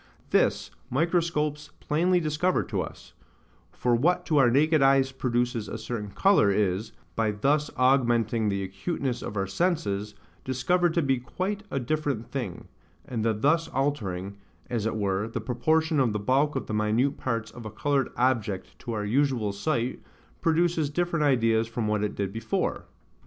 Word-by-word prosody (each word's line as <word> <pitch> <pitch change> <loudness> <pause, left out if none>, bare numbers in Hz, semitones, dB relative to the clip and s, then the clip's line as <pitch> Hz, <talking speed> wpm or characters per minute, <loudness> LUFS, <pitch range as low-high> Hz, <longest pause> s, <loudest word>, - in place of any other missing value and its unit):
This - - +2 0.2
microscopes 150 0 0
plainly 175 +4 +2
discover 160 +3 +1
to - - -2
us; - - -9 0.6
for 125 - 0
what 175 +9 +2
to 150 -3 +3
our 125 -3 +6
naked 150 +4 +3
eyes 135 -1 +4
produces 120 -3 -1
a - - -4
certain 110 -2 -5
colour, 190 - +4
is, 100 +1 0 0.2
by 110 -1 +1
thus 145 +8 +1
augmenting 120 -4 +2
the 100 -1 -1
acuteness 120 - -3
of 105 - -5
our 95 - +1
senses, 105 - -1 0.3
discovered 170 +7 +1
to 170 - +2
be 135 -2 +1
quite 185 +11 -3
a 135 - -1
different 140 -3 -1
thing; 120 -10 -5 0.4
and 115 -4 -3
the 115 - +3
thus 155 +9 +2
altering, 100 - -2 0.3
as 115 -3 0
it 115 - -2
were, 100 0 0
the 115 0 -4
proportion 155 +7 +1
of 120 -5 +2
the 105 - -1
bulk 135 +8 +1
of 135 - -2
the - - -5
minute 110 +6 +1
parts 115 -3 -2
of 120 - -10
a 110 - -5
coloured 135 +5 0
object 115 -6 -1
to 120 - -5
our 105 -1 -2
usual 125 -2 +1
sight, 120 +3 -1 0.4
produces 165 -2 +2
different 170 0 0
ideas 115 -4 +3
from 115 -1 -3
what 105 -1 0
it 105 - -2
did 100 -1 -3
before. 110 -1 -2
125 Hz, 165 wpm, -27 LUFS, 110-150 Hz, 0.6 s, our